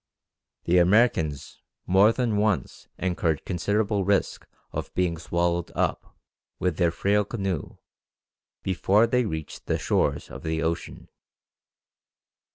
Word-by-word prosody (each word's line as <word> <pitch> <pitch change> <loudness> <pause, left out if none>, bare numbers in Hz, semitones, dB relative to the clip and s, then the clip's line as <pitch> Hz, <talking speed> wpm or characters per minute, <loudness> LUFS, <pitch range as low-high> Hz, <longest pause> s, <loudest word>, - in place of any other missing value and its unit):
The 90 +1 +3
Americans 85 - +2 0.2
more 95 +4 +5
than 115 -2 -1
once 105 -2 -1
incurred 85 -4 -1
considerable 100 +3 0
risk 100 0 0 0.2
of - - -5
being 90 -2 +1
swallowed 85 0 -1
up, - - -2 0.4
with 90 -3 -1
their 85 -2 +3
frail 100 +5 +1
canoe, 95 -7 -4 0.9
before 95 +3 +3
they 125 +1 +1
reached 80 -6 -6
the - - +1
shores - - 0
of 65 - -8
the 80 0 -2
ocean. 85 0 -3
90 Hz, 115 wpm, -26 LUFS, 85-105 Hz, 0.9 s, more